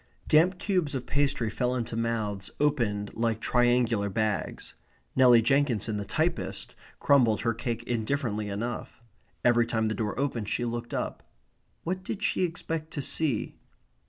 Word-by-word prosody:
Damp 175 +4 +4
cubes 180 -7 0
of 125 -2 -3
pastry 140 -4 +1
fell 125 +2 0
into 115 -2 -3
mouths 110 -4 -2
opened 115 -9 0
like 115 -1 0
triangular 120 -4 +2
bags. 105 -4 -2 0.4
Nelly 125 -3 +7
Jenkinson, 120 -5 +1
the 100 - -4
typist, - - -2 0.3
crumbled 120 -7 +4
her 115 -1 +1
cake 120 0 -3
indifferently 115 -3 -1
enough. 115 +4 -4 0.5
Every 120 -1 +4
time 110 -2 0
the - - -1
door 110 +1 -2
opened 120 -7 -1
she 120 - -1
looked 120 0 -4
up. - - -3 0.6
What 185 +2 -2
did 205 +2 -5
she 195 - +1
expect 165 -2 -3
to 145 - -2
see? 145 -8 0
120 Hz, 145 wpm, -28 LUFS, 110-140 Hz, 0.6 s, Nelly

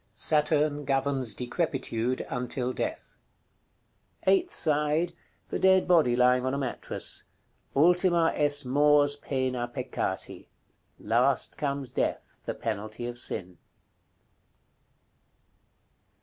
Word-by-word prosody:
Saturn 150 -1 +2
governs 135 -4 -1
decrepitude 130 -3 -2
until 125 +1 -2
death. 315 - -5 1.1
Eighth 365 -2 +3
side. 155 +2 0 0.4
The - - -3
dead 190 0 +4
body 160 -9 +4
lying 125 0 +3
on 130 +1 -1
a - - -2
mattress. 135 -3 -2 0.5
"ULTIMA 175 +2 +3
EST 145 -1 +3
MORS 145 +2 +3
PENA 130 -3 -2
PECCATI." 120 - -4 0.5
Last 120 +5 +1
comes 140 -3 -3
death, - - -2
the - - -3
penalty 110 +3 -4
of 120 0 -5
sin. 90 -7 -3
140 Hz, 95 wpm, -28 LUFS, 125-150 Hz, 1.1 s, dead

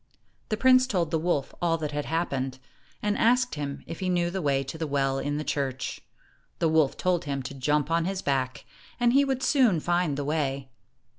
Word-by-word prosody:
The 215 - 0
prince 255 +1 +5
told 175 -9 0
the 160 - +1
wolf 155 -4 -1
all 165 -1 +2
that 155 -2 -4
had 145 0 -3
hap 165 +2 -1
pened, 130 -1 -2 0.5
and 210 0 +1
asked 245 +2 +3
him 140 -2 -5
if 165 - -7
he 185 - -1
knew 175 -1 +1
the 190 +1 -3
way 140 -3 +1
to 135 - -7
the 160 -1 -3
well 135 -1 0
in 145 +1 -2
the 155 - -2
church. 135 -4 -3 0.6
The 165 - +1
wolf 155 -3 +2
told 180 -2 0
him 140 -2 -3
to 135 - -6
jump 145 +3 0
on 165 0 +2
his 190 0 -3
back, 130 -2 -1 0.3
and 240 0 +3
he 280 +1 +5
would 265 -2 -1
soon 255 - +4
find 175 -3 0
the 145 - -2
way. 140 -3 -1
160 Hz, 215 wpm, -27 LUFS, 140-185 Hz, 0.6 s, prince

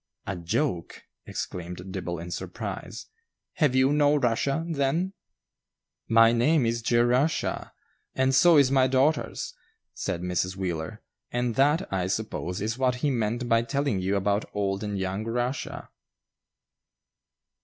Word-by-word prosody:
"A 95 - -3
joke!" 85 - -2 0.2
exclaimed 90 +1 -6
Dibble, 90 -2 -4
in 85 +1 -7
surprise. - - -6 0.5
"Have 145 -6 +3
you 130 +2 +4
no 145 0 +4
Russia, 140 +4 +1
then?" 165 +4 0 0.9
"My 115 0 +6
name 125 +4 +3
is 115 +1 0
Jerusha, 120 +6 +1 0.4
and 130 0 +2
so 165 +4 +6
is 135 -2 +5
my 130 -1 +4
daughter's," 135 +4 +1 0.4
said 85 - -3
Mrs. 90 +1 -1
Wheeler, 90 +2 -4 0.3
"and 120 -1 -1
that, 150 - +2
I 90 -1 0
suppose, 95 -3 -3
is 110 +4 -2
what 130 -1 +2
he 145 - +3
meant 120 0 -1
by 115 -1 +4
telling 140 -3 -1
you 95 +2 0
about 100 +2 0
old 100 0 -1
and 105 -1 -3
young 95 +2 -2
Rushia." 120 +4 -3
115 Hz, 135 wpm, -27 LUFS, 95-135 Hz, 0.9 s, My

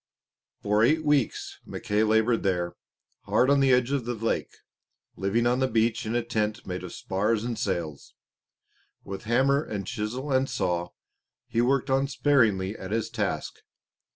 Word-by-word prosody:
For 105 +1 +2
eight 155 +6 +3
weeks 145 -5 0
Mackay 105 +1 -2
laboured 110 +2 +3
there, 90 -3 0 0.5
hard 130 +2 +3
on 140 - +4
the 135 -1 +4
edge 125 +1 +3
of 140 -4 0
the 120 0 -2
lake, 115 +1 -1 0.7
living 100 +5 0
on 125 +1 +2
the 130 - +2
beach 115 -1 +1
in 115 - -1
a 120 - +1
tent 110 -2 -2
made 90 0 -5
of 90 - -7
spars 105 +3 -1
and 120 0 -2
sails. 85 -9 -4 0.9
With 95 +2 -7
hammer 135 +5 +3
and 100 -3 -5
chisel 120 +9 -4
and 130 +1 +2
saw 90 -7 -1 0.6
he 120 -1 +1
worked 135 +2 +1
unsparingly 130 -8 +2
at 95 - -8
his 115 +1 -2
task. 105 -5 -3
115 Hz, 155 wpm, -27 LUFS, 100-130 Hz, 0.9 s, on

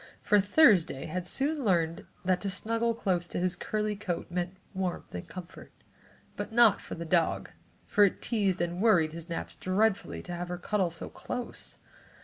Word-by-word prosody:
For 210 - +5
Thursday 200 - +4
had 180 +2 -4
soon 285 - 0
learned 170 -5 +1 0.2
that 185 -1 +2
to 200 - -1
snuggle 230 +4 0
close 185 -6 0
to - - -4
his 180 0 +1
curly 210 +1 -2
coat 180 -4 -4
meant 180 +1 -2 0.2
warmth 185 -2 -3
and 90 - -6
comfort, 180 -2 -10 0.6
but - - -5
not 225 -3 +5
for - - -7
the 170 - -6
dog, 165 0 +1 0.3
for 205 - +4
it 195 - 0
teased 200 -6 0
and 175 +1 -2
worried 180 -9 +4
his 170 +1 -8
naps 170 - -4
dreadfully 200 +2 0
to 175 - -6
have 175 0 -4
her 180 0 -4
cuddle 190 0 0
so 165 0 -7
close. 245 -1 -5
185 Hz, 175 wpm, -29 LUFS, 175-215 Hz, 0.6 s, For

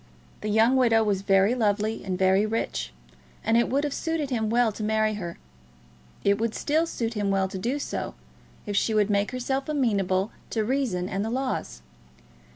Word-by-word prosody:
The 215 - -3
young 225 +5 +4
widow 230 -3 +4
was 200 -3 0
very 195 +3 +4
lovely 215 -2 0
and 185 -2 -2
very 190 +1 +4
rich, 220 - -2 0.5
and 225 - +2
it 235 - +3
would 275 +3 +1
have 290 -2 -1
suited 320 -4 -2
him 220 -3 0
well 235 0 +3
to 215 - -8
marry 215 0 +1
her. 175 -5 -5 0.9
It 200 +1 +3
would 225 -1 -1
still 315 +3 +1
suit 230 -6 -3
him 205 -2 -1
well 195 -1 +2
to 190 0 -6
do 245 +9 -1
so, 290 - -4 0.5
if 205 -2 -3
she 220 +2 +2
would 210 -1 +3
make 200 0 +1
herself 265 +2 -2
amenable 200 -8 +1 0.2
to 220 -2 -1
reason 230 -8 0
and 195 +1 -2
the 220 - -2
laws. 255 - -3
220 Hz, 185 wpm, -26 LUFS, 200-245 Hz, 0.9 s, young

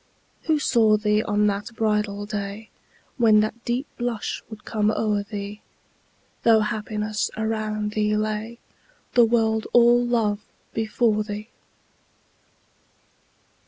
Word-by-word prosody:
Who 315 -2 +3
saw 225 -7 +3
thee 210 0 +2
on 205 0 +1
that 205 +2 -2
bridal 210 -2 0
day, 205 +1 -5 0.5
When 220 -4 +5
that 220 +2 -3
deep 245 +4 -1
blush 240 -3 -3
would 220 -1 -11
come 215 -1 +1
o'er 210 -1 0
thee, 205 0 -7 0.8
Though 225 -2 +5
happiness 210 0 -2
around 215 -1 -2
thee 210 0 +1
lay, 215 +2 -3 0.6
The 240 -1 +6
world 220 -1 +1
all 240 0 +6
love 225 -4 +1 0.3
before 220 -1 +1
thee. 210 +1 -6
215 Hz, 115 wpm, -24 LUFS, 210-225 Hz, 0.8 s, The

